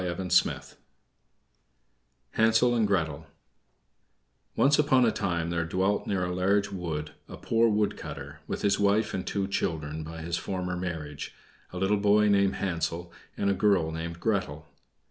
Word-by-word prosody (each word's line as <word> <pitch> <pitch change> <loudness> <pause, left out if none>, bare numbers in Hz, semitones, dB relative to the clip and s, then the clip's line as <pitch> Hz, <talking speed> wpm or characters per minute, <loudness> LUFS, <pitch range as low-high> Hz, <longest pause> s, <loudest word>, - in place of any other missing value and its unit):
HANSEL 115 +2 +3
AND 115 -3 +2
GRETEL 80 -7 -1 1.3
Once 145 +2 +4
upon 135 -4 +4
a 115 - +3
time 85 -4 -2
there 85 -1 0
dwelt 95 +5 0
near 95 -3 0
a 90 - -3
large 100 +3 +1
wood 80 -5 -4 0.2
a - - -9
poor 115 0 +2
wood 105 -1 +1
cutter, - - -8
with - - -4
his 100 0 +2
wife 105 +1 +2
and 95 - -3
two 100 -1 -1
children 80 -5 -2
by 80 +1 -8
his 85 +1 -2
former 90 -2 -3
marriage, 80 -5 -5 0.4
a 90 - -7
little 95 +3 +2
boy 105 +1 +4
called 100 -1 +3
Hansel 85 -1 -3 0.2
and 100 - +1
a - - +2
girl 95 -4 +2
named 85 +1 -5
Gretel. 90 -9 -1
95 Hz, 145 wpm, -28 LUFS, 85-105 Hz, 1.3 s, Once